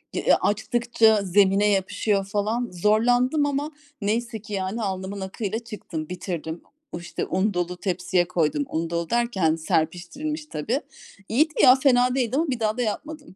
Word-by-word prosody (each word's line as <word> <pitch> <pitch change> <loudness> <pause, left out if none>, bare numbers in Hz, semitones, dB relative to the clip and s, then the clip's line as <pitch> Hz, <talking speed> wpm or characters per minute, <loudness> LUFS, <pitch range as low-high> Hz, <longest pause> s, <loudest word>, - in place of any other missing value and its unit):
D - - 0
ııı - - +7
açtıkça 225 0 +2
zemine 195 +2 +3
yapışıyor 195 +1 0
falan. 215 +4 -1
Zorlandım 245 - +2
ama 290 +2 -2 0.3
neyse 225 +1 -1
ki 210 -1 -9
yani, 195 +4 -2
alnımın 190 0 -4
akıyla 200 +3 -3
çıktım, 180 -9 -7
bitirdim. 175 -3 -5 0.3
O 170 - -5
işte 175 - -4
un 195 +2 0
dolu 180 0 -2
tepsiye 180 -1 0
koydum. 180 - 0
Un 165 +1 -2
dolu 170 0 -2
derken 220 -9 +1
serpiştirilmiş 180 - -2
tabii. 240 - -2 0.5
İyiydi 305 +7 +2
ya 255 -1 +9
fena 255 -2 +3
değildi 250 -1 0
ama 325 +2 +1
bir 250 -3 -2
daha 215 +1 0
da - - 0
yapmadım 295 +7 -4
yani. - - -15
210 Hz, 160 wpm, -24 LUFS, 180-245 Hz, 0.5 s, ya